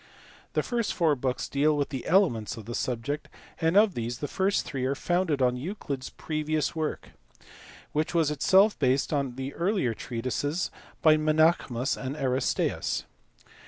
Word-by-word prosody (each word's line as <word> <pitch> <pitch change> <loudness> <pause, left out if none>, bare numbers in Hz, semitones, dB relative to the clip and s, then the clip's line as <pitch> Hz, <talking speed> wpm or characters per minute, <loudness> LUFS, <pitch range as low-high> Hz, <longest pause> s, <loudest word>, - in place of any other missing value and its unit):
The - - +1
first 235 -3 -1
four 160 -4 +3
books 130 -1 -2
deal 150 +2 +2
with 145 - 0
the 130 -3 -5
elements 160 - +2
of 110 - -9
the 120 - -6
subject, 130 +6 -3 0.3
nd 165 +4 +3
of 210 -2 +5
these 120 -2 -3
the 145 - -4
first 195 +4 0
three 135 -2 -4
are 135 +2 0
founded 165 -3 0
on 125 0 +3
Euclid 145 -3 -4
s - - -6
previous 155 -1 -1
pork 160 -2 -3 0.8
(which 155 +3 -1
was 160 -3 +3
itself 195 +7 +4
based 135 +2 +2
on 140 -4 -1
the 135 +1 -5
earlier 175 - 0
treatises 130 - -2 0.3
by 155 -1 +7
^Tenaechmus 155 -6 +2
and 135 +2 -3
Aristaeus). 130 -3 0
145 Hz, 160 wpm, -27 LUFS, 130-165 Hz, 0.8 s, by